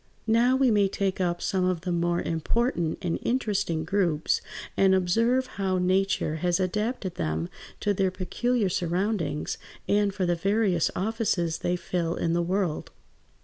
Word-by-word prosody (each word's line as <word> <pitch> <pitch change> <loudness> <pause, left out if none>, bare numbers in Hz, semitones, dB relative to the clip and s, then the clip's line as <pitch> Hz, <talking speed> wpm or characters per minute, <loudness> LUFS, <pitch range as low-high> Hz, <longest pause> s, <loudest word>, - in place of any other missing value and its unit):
Now 235 +3 +4
we 260 -2 +3
may 205 -2 +4
take 195 -1 -1
up 175 -1 -1
some 190 -2 0
of 180 -2 0
the 180 0 -3
more 175 0 0
important 170 - 0
and 170 -2 -1
interesting 205 -9 0
groups 170 -4 +1 0.3
and 190 -1 +4
observe 230 +8 +2
how 195 -6 -2
Nature 185 -3 +1
has 175 +2 +1
adapted 210 +1 -1
them 80 +2 -1 0.3
to 205 - +2
their 190 -1 +1
peculiar 210 +5 0
surroundings, 175 -2 -1 0.3
and 205 0 +2
for 190 -1 -1
the 175 - +2
various 195 -1 +1
offices 190 -5 0
they 175 - 0
fill 175 -1 -2
in 165 - 0
the 175 - +2
world. 180 -2 -1
185 Hz, 150 wpm, -27 LUFS, 175-205 Hz, 0.3 s, Now